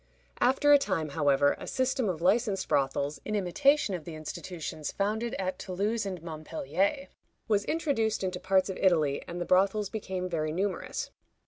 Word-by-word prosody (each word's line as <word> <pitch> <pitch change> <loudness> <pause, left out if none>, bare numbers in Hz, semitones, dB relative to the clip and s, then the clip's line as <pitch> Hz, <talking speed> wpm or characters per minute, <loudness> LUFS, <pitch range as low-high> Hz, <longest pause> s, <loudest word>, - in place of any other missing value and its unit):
After 275 +3 +4
a 285 - +8
time, 165 - -1
however, 145 -1 +3
a - - -8
system 260 -3 0
of 170 -2 -3
licensed 205 +1 +2
brothels, 140 +1 0
in 215 - -3
imitation 215 +6 +2
of 175 -4 -4
the 165 0 -7
institutions 155 0 -5
founded 220 +4 -1
at 185 -1 -3
Toulouse 205 +3 -1
and 180 -4 -5
Montpellier, 165 - -2 0.4
was 205 -2 +2
introduced 250 -11 0
into 185 -1 -2
parts 190 0 +2
of 185 - -6
Italy, 155 -7 +2
and 175 +1 -5
the 175 - -2
brothels 195 +2 +2
became 190 -4 -3
very 155 -3 -1
numerous. 185 +2 -2
190 Hz, 160 wpm, -29 LUFS, 165-215 Hz, 0.4 s, a